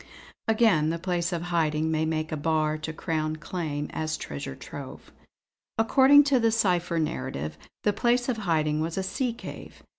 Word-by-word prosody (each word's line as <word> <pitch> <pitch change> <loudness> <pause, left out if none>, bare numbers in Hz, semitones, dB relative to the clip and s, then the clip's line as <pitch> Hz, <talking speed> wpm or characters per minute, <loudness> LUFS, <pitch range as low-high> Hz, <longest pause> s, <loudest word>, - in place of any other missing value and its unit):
"Again, 215 -9 +4
the 165 - -1
place 175 0 -1
of 170 -1 -2
hiding 160 -1 +1
may 160 0 +1
make 155 -1 -2
a - - -1
bar 155 0 +1
to 155 +1 -5
Crown 155 -1 -2
claim 155 -2 -4
as 155 0 -2
treasure 70 -2 -6
trove. - - -9 0.7
According 270 +6 +6
to 280 -3 +3
the 230 -1 +3
cipher 180 -6 +1
narrative 130 - -2 0.3
the 210 - +2
place 240 +3 +2
of 250 -3 0
hiding 155 -6 +1
was 165 +2 -3
a 190 - 0
sea 240 +7 -1
cave. 230 - -10
165 Hz, 170 wpm, -27 LUFS, 155-215 Hz, 0.7 s, According